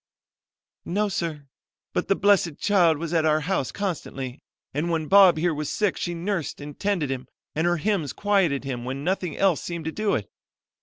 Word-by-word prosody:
"No, 205 +4 0
sir; 160 -6 -3 0.5
but - - -1
the 195 - +3
blessed 195 -7 +3
child 175 -6 +3
was 165 +2 -4
at 165 -2 +3
our 155 0 +3
house 160 -5 -1
constantly, 135 -9 -4 0.3
and 150 +5 -1
when 165 -2 0
Bob 190 -2 +7
here 170 +1 +1
was 150 -1 -3
sick 210 -3 +1
she 175 -1 -3
nursed 175 -1 -3
and 145 0 -9
tended 190 -9 0
him 130 -1 -4 0.3
and 160 +3 +1
her 175 0 +2
hymns 170 -4 0
quieted 195 -10 +1
him 125 -3 -4
when 135 +3 -4
nothing 180 -2 -1
else 190 -5 +3
seemed 170 -2 -5
to 160 - -1
do 215 +3 0
it. 105 - -3
170 Hz, 190 wpm, -25 LUFS, 150-195 Hz, 0.5 s, Bob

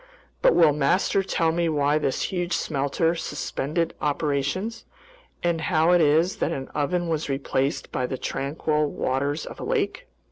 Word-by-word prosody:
"But - - +5
will 160 -4 +6
master 150 +7 +2
tell 165 -4 +1
me 170 0 0
why 145 0 +2
this 135 - -1
huge 175 0 -1
smelter 145 +3 0
suspended 160 0 -2
operations, 150 +8 -1 0.6
and 170 -2 +1
how 160 0 +3
it 175 -1 +5
is 160 +4 +3
that - - 0
an 135 -1 -4
oven 170 +4 -1
was 160 -2 -2
replaced 135 0 -1
by 125 - -1
the 130 - -4
tranquil 150 +3 -1
waters 140 +2 -1
of - - -9
a - - -5
lake?" - - -1
155 Hz, 155 wpm, -25 LUFS, 140-170 Hz, 0.6 s, will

